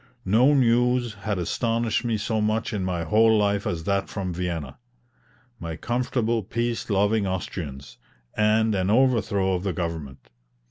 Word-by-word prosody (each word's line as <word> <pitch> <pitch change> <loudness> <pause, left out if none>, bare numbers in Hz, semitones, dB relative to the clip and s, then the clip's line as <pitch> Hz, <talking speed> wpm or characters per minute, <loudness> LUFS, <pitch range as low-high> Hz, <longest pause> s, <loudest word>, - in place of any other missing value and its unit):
No 120 +9 +4
news 125 -1 +2
had 105 -1 -3
astonished 115 +6 -1
me 115 -2 0
so 110 +1 -1
much 110 +1 -1
in 100 -3 -2
my 90 -2 -2
whole 110 +6 +4
life 100 -1 +1
as 80 -1 -3
that 100 +2 -1
from 95 -3 -4
Vienna. 85 - -4 0.8
My 85 -1 -5
comfortable, 120 +1 -1
peace 115 +4 -3
loving 100 +1 +2
Austrians, 80 -7 -5 0.4
and 110 +1 +2
an 95 -1 0
overthrow 105 -5 +2
of 90 - -1
the 95 -1 -2
government! 80 -6 -5
105 Hz, 145 wpm, -25 LUFS, 90-115 Hz, 0.8 s, No